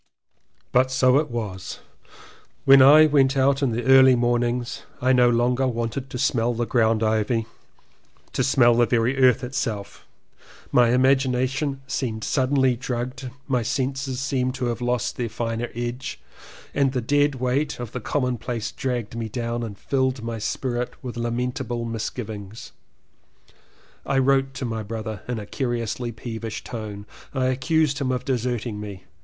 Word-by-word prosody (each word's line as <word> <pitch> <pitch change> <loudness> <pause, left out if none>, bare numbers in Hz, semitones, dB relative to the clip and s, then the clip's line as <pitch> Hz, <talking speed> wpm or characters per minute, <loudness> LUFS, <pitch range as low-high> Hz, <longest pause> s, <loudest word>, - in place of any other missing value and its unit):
But 130 +1 +3
so 130 +1 +4
it 150 -1 -2
was. 105 -6 -5 0.9
When 135 0 +8
I 150 +4 +8
went 140 -2 +3
out 135 +1 +3
in 135 -4 +1
the 120 +2 -2
early 130 -1 +7
mornings, 120 0 0 0.2
I 130 +1 +3
no 125 -1 +5
longer 125 +2 +2
wanted 120 +2 -3
to 125 - -5
smell 120 -2 +1
ground 115 -1 +1
ivy, 110 +1 +1 0.9
to 130 - +1
smell 125 -2 +5
the 120 0 +3
very 120 +2 +1
earth 125 -1 +5
itself, 120 -5 -4 0.6
my 120 -1 +5
imagination 130 +2 +1
seemed 115 -4 -3
suddenly 130 -1 +2
drugged, 125 +2 -4 0.2
my 130 -3 +1
senses 135 +2 -2
seemed 130 -2 -1
to 130 -1 -2
have 115 - -10
lost 125 -2 -1
their 120 -2 -2
finer 115 +1 -3
edge 120 -3 -4 0.5
and 135 -2 +2
the 125 - 0
dead 145 +3 +2
weight 130 +4 -1
of 120 -3 -6
the 125 - -5
commonplace 125 -2 -2
dragged 120 -4 -3
me 115 -1 -4
down 120 +1 -3
and 110 -4 -6
filled 130 -1 -1
my 115 -1 -4
spirit 125 +2 -3
with 125 -2 -6
lamentable 120 0 -2
misgivings. 110 -2 -6 1.3
I 135 - -1
wrote 135 0 +2
to 130 - -4
my 115 -2 -3
brother 110 -1 -5
in 125 -1 -2
a 105 - -6
curiously 120 0 -3
peevish 115 -1 -6
tone. 105 -3 -7 0.3
I 130 -1 +1
accused 145 +2 +1
him 130 -1 0
of 125 0 -2
deserting 120 -4 -2
me. 100 -3 -8
125 Hz, 150 wpm, -24 LUFS, 115-130 Hz, 1.3 s, When